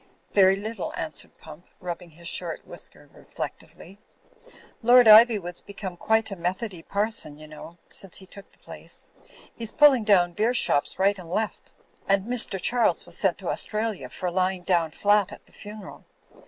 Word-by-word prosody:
'Very 190 -1 +5
little," 215 0 -5
answered 155 -1 -4
Pump, 160 +2 -14
rubbing 175 -1 -7
his 170 +2 -8
short 170 -2 +1
whisker - - -10
reflectively. 195 +4 -9 0.8
"Lord 245 +1 +6
Ivywood's 215 -5 +6
become 195 -2 -8
quite 220 +4 0
a - - -4
Methody 185 +1 -4
parson, 200 -7 -1
you 155 0 -13
know, 155 +2 -12
since 195 -3 0
he 190 - -10
took 200 +1 -14
the - - -23
place; - - -6 0.4
he's 230 -2 -3
pulling 275 -6 +5
down 180 -5 +3
beer 225 +6 0
shops 145 -10 +2
right 195 +1 +1
and 170 -2 -11
left. 215 +5 -4 0.4
And 195 0 +2
Mr. 235 -5 -1
Charles 240 +6 +1
was - - -3
sent - - +1
to - - -6
Australia 215 - -2
for 180 +5 -4
lying 185 0 -1
down 170 -3 +1
flat 205 +3 +1
at - - -13
the - - -23
funeral. 210 -1 -11
195 Hz, 165 wpm, -25 LUFS, 175-215 Hz, 0.8 s, Lord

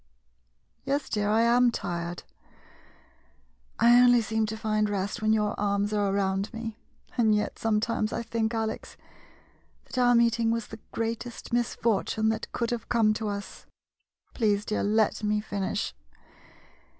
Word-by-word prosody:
Yes, 275 0 -1
dear, 205 -1 0
I 220 +2 +3
am 240 +1 +5
tired. 175 -5 -4 1.5
I 240 +1 +6
only 245 -1 +6
seem 220 0 0
to 220 +1 -4
find 215 -1 0
rest 200 +2 -2
when 215 0 +2
your 210 -1 +2
arms 205 0 0
are 205 -1 +1
around 195 +1 0
me 225 -1 -6 0.2
— - - -26
and 220 -2 +4
yet, 210 - -2
sometimes 220 0 0
I - - -3
think, 225 -1 -1
Alex, 220 -1 -4 0.9
that 255 - -4
our 245 -1 +5
meet 235 -1 +3
ing 225 -1 +2
was 230 -1 -1
the 220 - -9
greatest 230 +1 -4
misfortune 220 -2 +1
that 220 0 -3
could 235 -1 -2
have 235 -2 -4
come 225 -3 +3
to 215 0 -3
us. 200 -1 -6 0.7
Please, 210 -3 +1
dear, 215 - -1
let 215 +1 +1
me 210 0 +1
finish. 205 -1 -3
220 Hz, 150 wpm, -27 LUFS, 210-230 Hz, 1.5 s, I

